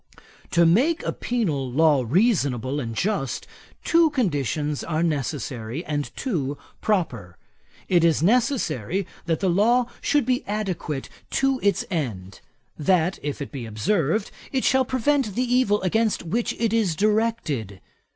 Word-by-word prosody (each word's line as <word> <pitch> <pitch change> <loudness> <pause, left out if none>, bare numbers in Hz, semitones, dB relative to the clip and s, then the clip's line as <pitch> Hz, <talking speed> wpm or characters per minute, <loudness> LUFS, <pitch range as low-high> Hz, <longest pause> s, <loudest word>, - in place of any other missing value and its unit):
'To 170 0 +4
make 265 - +3
a - - -1
penal 155 - -1
law 145 -1 +4
reasonable 145 - +1
and 115 -4 -4
just, 180 - -1 0.4
two 335 -1 +4
conditions 150 - -1
are 160 0 -1
necessary, 140 -3 -3
and 145 -1 -2
two 145 - -2 0.2
proper. 125 - -1 0.5
It 175 -2 +3
is 160 -2 +3
necessary 195 - +1 0.2
that 165 -1 0
the 195 - +2
law 230 +7 +3 0.2
should 290 -4 +2
be 255 0 +1
adequate 185 -9 -3 0.2
to 270 -1 +1
its 200 -3 +1
end; 100 - -4 0.4
that, 180 +2 +2
if 145 0 -3
it - - -10
be 130 -5 -6
observed, 160 - 0 0.2
it 265 -2 0
shall 265 0 +3
prevent 260 -3 0
the 250 - +1
evil 245 -5 +2
against 220 +3 +1
which 220 +8 -1
it 225 -2 0
is 210 -8 +2
directed. 205 - 0
175 Hz, 140 wpm, -24 LUFS, 140-230 Hz, 0.5 s, To